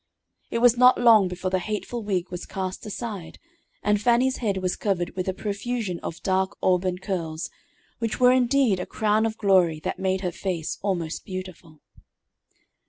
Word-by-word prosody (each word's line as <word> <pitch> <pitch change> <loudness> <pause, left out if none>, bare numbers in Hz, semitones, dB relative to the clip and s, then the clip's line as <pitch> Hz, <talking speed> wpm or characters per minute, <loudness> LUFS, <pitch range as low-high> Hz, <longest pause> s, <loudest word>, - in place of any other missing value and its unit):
It 230 - -1
was 240 0 +6
not 250 +1 +6
long 225 -5 +6
before 180 +1 -4
the 185 - +2
hateful 215 +4 -4
wig 185 -4 -2
was 180 0 -6
cast 190 +1 -5
aside, 210 -5 -6 0.5
and 210 -1 +2
Fannie's 245 +3 +3
head 205 -5 -1
was 185 -1 -1
covered 180 -4 -1
with 185 0 -3
a 190 - 0
profusion 205 -2 -3
of 165 - -7
dark 190 0 0
auburn 180 0 +2
curls, 170 -5 -4 0.5
which 230 -2 -2
were 250 0 +6
indeed 255 -5 +3
a - - -4
crown 215 +1 +1
of 220 0 -5
glory 185 -7 +3
that - - -4
made 190 0 0
her 180 -2 -1
face 170 -2 -3
almost 175 -5 -2
beautiful. 185 -5 -8
190 Hz, 170 wpm, -25 LUFS, 180-220 Hz, 0.5 s, was